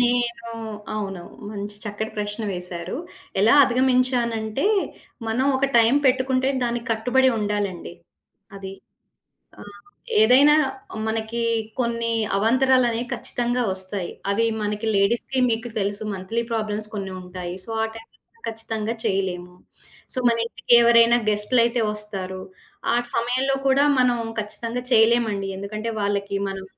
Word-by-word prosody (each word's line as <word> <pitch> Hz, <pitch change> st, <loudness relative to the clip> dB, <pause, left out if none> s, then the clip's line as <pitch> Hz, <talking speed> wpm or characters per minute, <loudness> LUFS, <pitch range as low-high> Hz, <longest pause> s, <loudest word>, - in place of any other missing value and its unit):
నేనూ 240 Hz, -1 st, 0 dB, 0.4 s
అవును. 195 Hz, -4 st, -4 dB, 0.3 s
మంచి 205 Hz, 0 st, -6 dB
చక్కటి 215 Hz, +1 st, -4 dB
ప్రశ్న 210 Hz, +2 st, -3 dB
వేశారు. 180 Hz, +3 st, -3 dB, 0.4 s
ఎలా 220 Hz, +5 st, +5 dB
అధిగమించానంటే, 250 Hz, -, +1 dB, 0.6 s
మనం 255 Hz, +5 st, 0 dB
ఒక 270 Hz, -, 0 dB
టైమ్ 230 Hz, +5 st, +5 dB
పెట్టుకుంటే 260 Hz, 0 st, +2 dB
దానికి 240 Hz, 0 st, -2 dB
కట్టుబడి 250 Hz, +4 st, +2 dB
ఉండాలండి. 205 Hz, -5 st, -3 dB, 0.6 s
అది. 195 Hz, -1 st, -7 dB, 0.9 s
ఆహ్, 205 Hz, 0 st, -12 dB, 0.5 s
ఏదైనా 275 Hz, +7 st, +6 dB, 0.5 s
మనకీ 225 Hz, +1 st, -2 dB, 0.4 s
కొన్నీ 230 Hz, -1 st, -1 dB, 0.2 s
అవాంతరాలనేయి 245 Hz, +2 st, +2 dB
ఖచ్చితంగా 245 Hz, +1 st, -1 dB
ఒస్తాయి. 190 Hz, -1 st, 0 dB, 0.2 s
అవి 230 Hz, +3 st, +2 dB, 0.2 s
మనకి 210 Hz, +1 st, -3 dB
లేడీస్‌కి 235 Hz, +6 st, +1 dB
మీకు 230 Hz, +1 st, -2 dB
తెలుసు, 205 Hz, +1 st, -2 dB
మంత్లీ 195 Hz, +5 st, -3 dB
ప్రాబ్లమ్స్ 215 Hz, -1 st, -1 dB
కొన్ని 195 Hz, -2 st, -4 dB
ఉంటాయి. 180 Hz, -1 st, -7 dB
సో, -, -, -9 dB
ఆ -, -, 0 dB
టైమ్‌లో 230 Hz, -, -17 dB
ఖచ్చితంగా 225 Hz, 0 st, -3 dB
చెయ్యలేము. 180 Hz, -2 st, -2 dB, 0.6 s
సో, -, -, +2 dB
మనింటికెవరైనా 235 Hz, 0 st, +4 dB
గెస్ట్‌లైతే 235 Hz, +3 st, +3 dB
ఒస్తారు. 195 Hz, -3 st, -2 dB, 0.5 s
ఆ -, -, +3 dB, 0.2 s
సమయంలో 255 Hz, +3 st, 0 dB
కూడా 275 Hz, +2 st, +4 dB, 0.2 s
మనం 245 Hz, -1 st, +3 dB, 0.2 s
ఖచ్చితంగా 230 Hz, +3 st, -4 dB
చెయలేమండి. 225 Hz, -3 st, +3 dB
ఎందుకంటే, 215 Hz, +3 st, -4 dB
వాళ్ళకి 200 Hz, 0 st, -1 dB
మనం 195 Hz, 0 st, -6 dB
225 Hz, 110 wpm, -23 LUFS, 205-240 Hz, 0.9 s, ఏదైనా